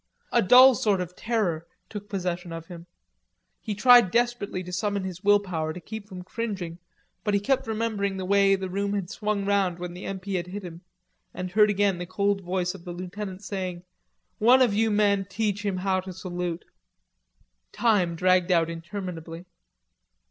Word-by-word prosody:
A 235 - +4
dull 255 +6 +8
sort 210 -4 +1
of 180 0 -5
terror 190 -9 -1 0.2
took 205 -1 -8
possession 180 -3 -3
of 165 0 -7
him. 170 -1 -11 0.7
He 210 - -4
tried 240 -1 +7
desperately 235 -4 0
to 180 0 -8
summon 200 +1 -1
his 185 0 -6
will 205 0 +5
power, 160 -5 -3
to 180 - -8
keep 210 +4 -8
from 180 -2 -8
cringing, 190 -5 -5 0.4
but 210 -2 +1
he - - +3
kept 265 +4 0
remembering 215 -3 -1
the 190 - -4
way 195 0 +4
the 190 -1 -4
room 200 +2 -2
had 195 -3 -3
swung 210 -2 -2
round 195 -3 +1
when 175 0 -6
the 180 - -9
M.P. 195 0 -5
had 175 -1 -2
hit 200 +2 -6
him, 170 -1 -9 0.5
and 185 0 -5
heard 210 +2 +5
again 200 -2 +1
the 175 - -5
cold 200 +2 0
voice 180 0 -2
of 190 -3 -12
the 175 -1 -6
lieutenant 185 +2 -7
saying: 185 -4 -4 0.6
"One 250 +4 +6
of 235 -5 +2
you 220 +2 +2
men 205 -2 +2
teach 205 0 -1
him 200 -3 -1
how 190 0 0
to 185 0 -7
salute." 175 -2 -4 1.1
Time 200 -8 +2
dragged 185 +1 +3
out 165 -2 +3
interminably. 170 -1 -7
190 Hz, 180 wpm, -26 LUFS, 180-205 Hz, 1.1 s, dull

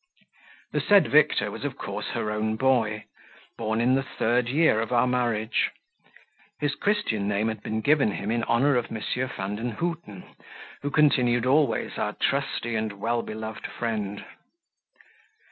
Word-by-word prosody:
The - - 0
said 200 -6 +5
Victor 150 0 +4
was - - -7
of - - -4
course - - -5
her 105 - -1
own 110 +1 -1
boy, 110 -4 +1 0.5
born 110 0 -1
in 125 +2 +3
the 135 - +3
third 120 -2 0
year 145 -5 +3
of 115 - -4
our 120 0 +4
marriage: 120 -3 0 0.9
his 145 -1 0
Christian 200 - 0
name 105 +2 +1
had 110 -2 -5
been 110 +1 -3
given 140 -5 +3
him 100 +2 -3
in 115 0 0
honour 130 +3 +3
of 120 - 0
M. 110 - -4 0.3
Vandenhuten, 115 - -4 0.6
who 145 - -2
continued 125 -5 +3
always 135 -2 +1
our - - -1
trusty 120 0 -1
and 110 -1 -1
well 115 +4 -1
beloved 110 0 -6
friend. 105 -4 -4
115 Hz, 145 wpm, -26 LUFS, 110-130 Hz, 0.9 s, said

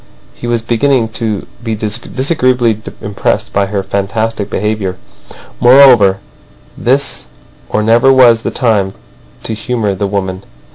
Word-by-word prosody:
He 120 - -8
was 120 -1 -1
beginning 120 0 +1
to 110 -2 -3 0.2
be 115 -2 -2
disagreeably 120 +1 0 0.2
impressed 100 -1 -2
by 100 -1 +1
her 100 0 -2
fantastic 100 +2 -2
behaviour. 105 -3 -2 0.6
Moreover, 120 -6 +6 0.6
this 135 - 0 0.4
or 105 - 0
never 120 +5 +4
was 120 -4 +5
the - - -2
time 105 -6 0 0.5
to 110 - -3
humour 110 -2 -2
the 100 +1 -2
woman. 95 -1 -3
110 Hz, 125 wpm, -13 LUFS, 100-120 Hz, 0.6 s, Moreover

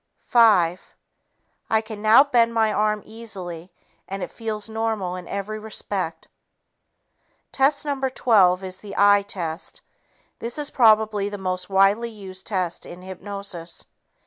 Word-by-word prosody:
Five... 190 -7 +3 0.7
I 220 - +3
can 220 -1 -9
now 220 +5 +7
bend 235 -5 +2
my 220 -1 +3
arm 210 0 +1
easily 185 -6 -8 0.4
and 195 -1 -4
it - - -6
feels 220 -2 -5
normal 220 -5 -2
in 180 -1 -8
every 200 +2 -4
respect." 200 -5 -4 1.2
Test 280 +2 +2
No. 285 -2 -2
12 195 -8 +3
is 185 0 -6
the 205 - -9
"eye" 205 0 +6
test. 190 - -5 0.6
This 235 +3 -5
is 295 -1 -2
probably 215 -4 +4
the 205 - -6
most 185 -1 -3
widely 200 +4 +3
used 190 -4 -9
test 185 -5 -2
in 175 +1 -10
hypnosis. 190 -2 -6
205 Hz, 135 wpm, -23 LUFS, 185-225 Hz, 1.2 s, now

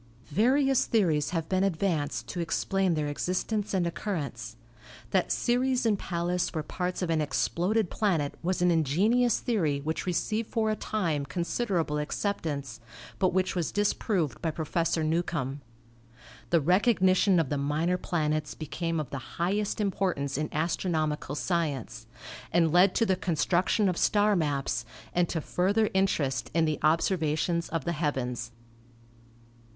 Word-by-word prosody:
Various 265 - +3
theories 160 -10 +2
have 165 -2 -2
been 185 0 +1
advanced 160 - 0
to 180 - -4
explain 185 +1 0
their 155 -1 -1
existence 185 +8 -2
and 185 -3 +1
occurrence. 145 - -4 0.6
That 190 -2 +1
Ceres 250 +1 +1
and 210 -3 +2
Pallas 175 0 -2
were 155 - -1
parts 180 +3 -3
of 170 - -1
an 160 -1 +2
ex 145 -2 0
ploded 200 +3 0
planet 170 -9 0
was 180 +1 0
an 180 - +4
ingenious 195 - +2
theory 165 - 0
which 160 +6 -3
received 215 +5 -1
for 220 -2 +1
a - - 0
time 170 -11 -1
considerable 170 - -1
acceptance, 150 - -3 0.4
but 185 -2 +3
which 185 +1 0
was 175 -3 -1
disproved 200 - 0
by 165 - 0
Professor 160 +1 -1
Newcomb. 155 -4 -1 0.9
The 170 -2 +3
recognition 185 - +4
of 155 -5 0
the 145 - -1
minor 155 +6 0
planets 155 -3 -1
became 165 +1 -3
of 150 -5 -5
the 130 -2 -8
highest 200 +5 0
importance 185 -9 -1
in 150 +2 -2
astronomical 155 -2 -1
science, 140 - -2 0.4
and 165 -1 +3
led 180 +3 +5
to 230 - +3
the 190 -3 +2
construction 180 +3 +1
of 180 -2 0
star 205 0 +3
maps 140 - -1 0.3
and 175 -1 +2
to 165 - -2
further 200 +7 +1
interest 140 -10 0
in 165 -1 +4
the 155 -1 -1
observations 165 0 +1
of 165 -1 -3
the 170 - 0
heavens. 125 -7 -2
170 Hz, 145 wpm, -28 LUFS, 150-195 Hz, 0.9 s, led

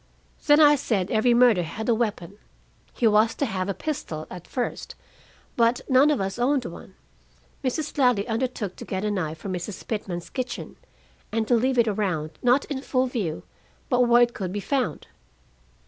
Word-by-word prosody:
"Then 295 0 +6
I 295 -1 +8
said 200 -7 -1
every 235 +2 +3
murder 240 -6 +5
had 175 +7 -5
a 235 - +4
weapon. 210 -4 -3 0.5
He 240 - -2
was 220 +1 +4
to 280 - 0
have 190 -4 -3
a 195 - -2
pistol 165 - -4
at 180 -2 -9
first, 245 -2 -4 0.6
but 235 +1 +2
none 265 +3 +5
of 295 - +1
us 195 +3 -3
owned 260 +1 +1
one. 180 +2 -10 0.7
Mrs. 285 +4 -2
Ladley 245 -6 +3
undertook 230 -4 -2
to - - -8
get 190 +1 -3
a 210 - 0
knife 160 -6 -2
from 185 +4 -5
Mrs. 180 +3 -6
Pitman's 185 -6 -4
kitchen, 255 -2 -5 0.6
and 220 0 -1
to - - +2
leave 255 +2 +2
it 235 -1 +4
around, 185 -7 -1
not 250 +3 +3
in 275 -3 -4
full 260 -1 0
view, 210 -11 -3 0.5
but 250 -3 +3
where 240 0 +6
it 240 0 0
could 185 -6 -4
be 205 - -3
found." 265 +5 -2
225 Hz, 180 wpm, -25 LUFS, 195-250 Hz, 0.7 s, I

